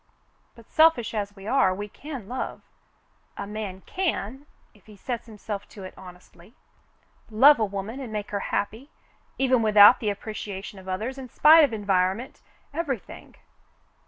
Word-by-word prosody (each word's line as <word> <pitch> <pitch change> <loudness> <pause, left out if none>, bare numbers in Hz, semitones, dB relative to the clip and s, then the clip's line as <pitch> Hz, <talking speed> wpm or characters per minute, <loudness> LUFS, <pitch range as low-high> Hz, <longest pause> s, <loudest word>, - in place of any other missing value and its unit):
"But 230 -1 -17
selfish 315 -9 +4
as 205 -1 -3
we 195 -1 -12
are, 215 -6 +2
we 205 +2 -5
can 270 -1 -9
love 255 +3 -5 0.4
— - - -40
a - - -4
man 205 -2 -6
can, 290 - -3 0.3
if 210 - -25
he 210 - -14
sets 235 +3 -5
himself 210 -2 -7
to 200 - -11
it 185 - -9
honestly, 180 +2 -15 0.4
— - - -39 0.2
love 265 +6 +6
a 220 - +2
woman 200 +5 -6
and 255 -5 -7
make 210 -1 -5
her 200 - -1
happy, 225 +7 -3 0.5
even 260 -2 +2
without 215 +1 +7
the 215 - -1
appreciation 205 -1 -6
of 190 - -14
others, 225 +9 -4
in 255 -2 -9
spite 315 +6 +7
of 285 - +2
environment, 200 +2 -1 0.2
— - - -37
everything. 285 - -5
215 Hz, 165 wpm, -25 LUFS, 200-260 Hz, 0.5 s, without